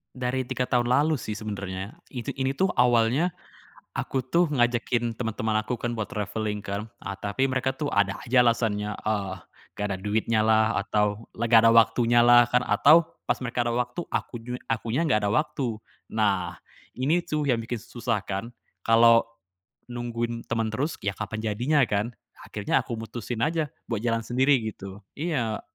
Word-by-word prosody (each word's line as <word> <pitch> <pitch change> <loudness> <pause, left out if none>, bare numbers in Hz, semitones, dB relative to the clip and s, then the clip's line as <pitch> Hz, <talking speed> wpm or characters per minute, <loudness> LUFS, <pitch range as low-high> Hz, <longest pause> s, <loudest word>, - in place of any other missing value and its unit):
Dari 125 +1 -1
3 125 0 -2
tahun 120 -1 +1
lalu 150 +4 +3
sih 120 - -5
sebenernya, 100 -2 -5 0.2
itu 120 -3 -5
ini 135 -1 0
tuh 185 +8 +1
awalnya 125 +7 +3 0.7
aku 135 - -1
tuh 170 +8 +2
ngajakin 120 -2 +1
teman-teman 110 -2 -1
aku 120 0 -3
kan 120 -1 -2
buat 110 - -1
travelling 105 0 -3
kan, 100 +2 -4 0.2
eee, 100 - -5
tapi 105 +7 -1
mereka 130 0 0
tuh 145 +2 -3
ada 100 -1 +2
aja 125 0 +3
alasannya, 105 -3 +1
eee, 100 -3 -1 0.4
gak 105 - -3
ada 95 - -2
duitnyalah, 110 +2 +2
atau 105 +1 0
lagi 115 0 +3
gak - - +8
ada 115 - +7
waktunyalah 120 +1 +6
kan, 125 - +5
atau 160 +6 +5 0.2
pas - - +2
mereka 120 -1 -1
ada 120 - 0
waktu, 125 +7 -2
aku - - -2
ju 125 - -6 0.2
akunya 115 +4 -1
ga 105 - +4
ada - - +1
waktu. 140 -7 -1 0.3
Nah, 100 -5 +1 0.4
ini 155 +7 0
tuh 150 -2 -1
yang 120 - +3
bikin 115 0 -4
susah 115 -3 -2
kan, 100 +5 -5 0.3
kalo 115 0 +6 0.6
nungguin 120 -1 -4
temen 115 -2 -1
terus, 140 +8 -2
ya 100 - 0
kapan 110 +1 -4
jadinya 135 +7 +2
kan. 105 -1 -1 0.3
Akhirnya - - -1
aku 115 - -5
mutusin 115 +1 -4
aja, 160 0 0 0.2
buat 115 -3 -3
jalan 115 -1 -1
sendiri 130 +4 +3
gitu, 100 -2 -8
iya. 130 -9 -2
115 Hz, 165 wpm, -26 LUFS, 110-125 Hz, 0.7 s, gak